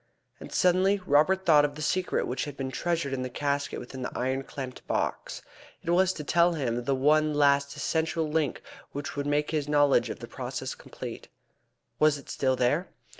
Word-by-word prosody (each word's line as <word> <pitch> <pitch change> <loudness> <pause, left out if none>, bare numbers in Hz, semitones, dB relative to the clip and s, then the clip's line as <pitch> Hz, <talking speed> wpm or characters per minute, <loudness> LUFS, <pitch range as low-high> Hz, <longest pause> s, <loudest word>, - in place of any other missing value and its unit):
And - - -10
suddenly 185 +3 +3
Robert 185 +5 +3
thought 150 -3 +6
of 145 -1 -1
the 155 - -7
secret 185 +5 0
which 130 +2 -2
had 145 -2 -8
been 135 -1 -3
treasured 165 -2 -1
in 130 - -2
the 130 - -3
casket 140 +2 -2
within 130 +1 -8
the 125 - -3
iron 130 +2 0
clamped 130 -1 -7
box. - - -2 0.4
It 170 - -1
was 185 +1 +4
to 150 - -6
tell 170 +3 +3
him 120 -6 -2
the 135 - +1
one 150 +3 +3
last 140 -1 +3
essential 160 0 -1
link 150 -3 -1 0.3
which 145 +1 -5
would 145 0 -2
make 145 +1 +1
his 150 -3 -1
knowledge 145 -1 +4
of - - -5
the - - -9
process - - -5
complete. - - -9 0.7
Was 155 -1 +4
it 140 - -10
still 130 -1 +1
there? 130 +8 +1
145 Hz, 190 wpm, -28 LUFS, 135-160 Hz, 0.7 s, thought